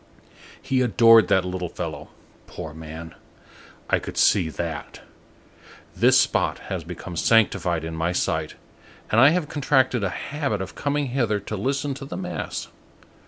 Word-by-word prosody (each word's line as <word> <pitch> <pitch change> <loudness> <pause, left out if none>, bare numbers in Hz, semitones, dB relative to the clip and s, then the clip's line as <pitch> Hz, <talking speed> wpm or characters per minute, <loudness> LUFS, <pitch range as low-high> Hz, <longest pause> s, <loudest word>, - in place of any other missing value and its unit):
He 130 -1 0
adored 115 -3 +6
that 95 -1 +2
little 90 -1 -4
fellow, 80 -4 -6 0.4
poor 80 -3 -8
man! 80 +1 -9 0.7
I - - +2
could - - -8
see 90 -6 +4
that. 80 -2 -6 0.9
This - - +5
spot - - +1 0.2
has 90 -3 -3
become 85 +1 -8
sanctified 90 -4 +2
in 80 0 -5
my 85 +2 -1
sight, 90 - -1 0.6
and 115 - +5
I 135 - +8
have 165 -1 0
contracted 130 -5 +1
a 100 - +1
habit 135 - -3
of 95 0 -6
coming 145 -1 -1
hither 120 -5 0
to 105 - -5
listen 135 +6 -1
to 135 +1 -8
the 140 - -6
mass. 180 -1 -5
105 Hz, 150 wpm, -24 LUFS, 85-135 Hz, 0.9 s, I